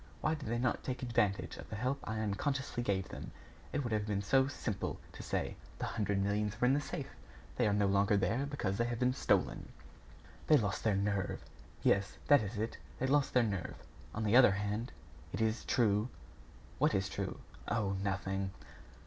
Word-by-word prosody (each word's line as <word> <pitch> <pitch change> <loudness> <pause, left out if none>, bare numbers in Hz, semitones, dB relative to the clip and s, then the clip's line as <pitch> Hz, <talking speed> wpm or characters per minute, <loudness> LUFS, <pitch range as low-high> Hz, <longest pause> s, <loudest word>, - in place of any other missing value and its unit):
Why - - +2
did 150 -7 -5
they 120 - 0
not 120 0 0
take 130 0 -3
advantage 105 -5 0
of - - -10
the - - -4
help 130 +6 -1
I 110 0 -2
unconsciously 130 +5 -1
gave 95 -5 0
them? - - -7 0.4
It 145 - -1
would 120 -3 -2
have 105 -1 0
been 100 -1 0
so 130 +6 +4
simple 110 -7 -3
to - - -8
say: - - -2 0.2
'The - - -2
hundred 100 -2 -1
millions 105 +2 0
were - - +3
in 130 - +5
the 145 - +2
safe. - - -5 0.5
They 120 - +3
are 105 - +2
no 105 0 +3
longer 100 +1 +3
there, 115 +9 +1
because 110 -9 -2
they 115 - +3
have 120 0 -2
been 125 +1 +2
stolen.'" - - +1 0.8
"They 155 - +7
lost 100 -6 -1
their 110 -3 +3
nerve." 100 -1 -1 0.4
"Yes, 100 -1 +2
that 145 -2 +8
is 105 +1 -4
it 110 +2 -3 0.2
they 130 - -1
lost 140 0 +2
their 125 - +6
nerve...On 105 +1 -5
the 105 +2 +3
other 125 -6 +8
hand, 105 +4 -2 0.4
it - - -2
is 110 0 +1
true 110 -1 +2 0.3
" - - -22
"What - - +3
is 95 0 +1
true?" - - -4 0.3
"Oh! 100 -4 0
nothing." 95 0 -1
110 Hz, 195 wpm, -34 LUFS, 100-125 Hz, 0.8 s, that